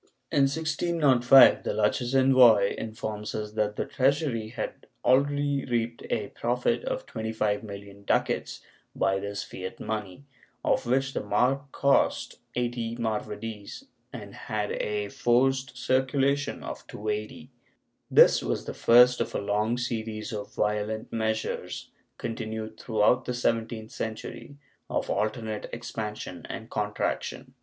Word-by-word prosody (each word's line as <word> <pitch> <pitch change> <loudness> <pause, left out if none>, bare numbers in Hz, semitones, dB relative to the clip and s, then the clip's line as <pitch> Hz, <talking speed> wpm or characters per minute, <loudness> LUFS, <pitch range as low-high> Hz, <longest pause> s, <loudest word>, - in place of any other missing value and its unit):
In 140 -1 +4
1605 145 -4 +5
the - - -2
Lucchese 120 +5 +1
envoy 125 -6 +6
informs 110 -1 -5
us 105 -1 -4
that 105 -1 -1
the - - -2
treasury 135 -4 +1
had 110 - -6 0.2
already 140 +2 +2
reaped 120 -1 -2
a 105 -2 -1
profit 125 - 0
of - - -3
25,000,000 105 -2 -4
ducats - - 0 0.3
by 95 0 +1
this 100 +1 -4
fiat 95 0 -7
money, 105 +3 -5 0.4
of 130 - +1
which 135 +2 +1
the - - -1
marc 130 +7 +1
cost 140 0 +1 0.2
80 120 -1 -2
maravedis 110 -2 -4 0.3
and - - -8
had 105 -1 -3
a 105 -1 -2
forced 130 +2 +1
circulation 135 +3 +1
of - - -7
280. 110 +5 -5 0.6
This - - +7
was - - -2
the - - -5
first 125 +1 +6
of - - -3
a - - +1
long 105 +3 0
series 115 -1 -3
of 105 -1 -5
violent 105 +1 -1
measures 110 -1 -2 0.3
continued 110 -1 -5
throughout 115 +3 +2
the 125 - -2
seventeenth 115 -2 -1
century, 110 +5 -6 0.3
of - - -1
alternate 110 0 -2
expansion 105 -5 -5
and 115 0 -7
contraction. 105 -1 -2
115 Hz, 125 wpm, -27 LUFS, 105-130 Hz, 0.6 s, This